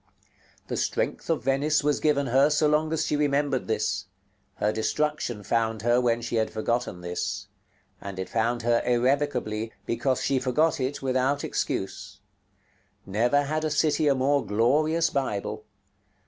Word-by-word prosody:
The - - -3
strength - - -2
of 160 -8 0
Venice 140 +3 +1
was 145 0 +1
given 145 -2 +2
her, 135 +3 +4
so 150 0 +3
long 155 +1 +1
as 160 -1 0
she - - 0
remembered 145 -2 0
this: 105 -3 -1 0.5
her 105 - 0
destruction 120 -1 -1
found 115 -1 0
her 120 +1 +3
when 120 -1 +1
she 115 0 -2
had 110 0 +1
forgotten 110 -4 -2
this; 90 0 -3 0.6
and 100 -1 -7
it 95 - -4
found 115 +1 0
her 120 0 +3
irrevocably, 125 -3 0
because 125 +2 0
she 135 -1 +1
forgot 140 +6 +1
it 135 +2 -3
without 130 +2 +1
excuse. - - -3 0.9
Never 120 +8 +2
had 155 +2 -1
city 150 0 +2
a 140 - +4
more 140 +2 +2
glorious 150 +11 +2
Bible. 110 -4 -2
130 Hz, 150 wpm, -26 LUFS, 115-145 Hz, 0.9 s, her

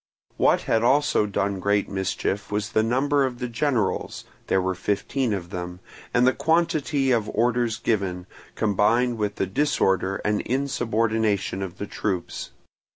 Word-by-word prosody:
What - - +3
had 110 - +1
also 130 -3 +3
done 100 -1 -1
great 100 +2 +1
mischief 95 +1 -2
was 105 0 -2
the 110 - +3
number 135 +5 +2
of 130 -2 -2
the 125 0 -3
generals 120 -2 -1 0.2
(there 95 - +2
were 95 0 0
fifteen 110 +7 -1
of 90 -3 -4
them) 90 -1 -5 0.3
and 120 0 +3
the 130 - +4
quantity 150 -3 +1
of 115 -4 +1
orders 120 0 +1
given, 95 -5 -1 0.3
combined 110 +3 +2
with 105 -1 -1
the - - 0
disorder 95 -5 +1
and 105 0 +1
insubordination 110 -6 0
of 95 -1 -5
the 100 - -4
troops. 95 -3 -3
110 Hz, 150 wpm, -24 LUFS, 100-125 Hz, 0.3 s, the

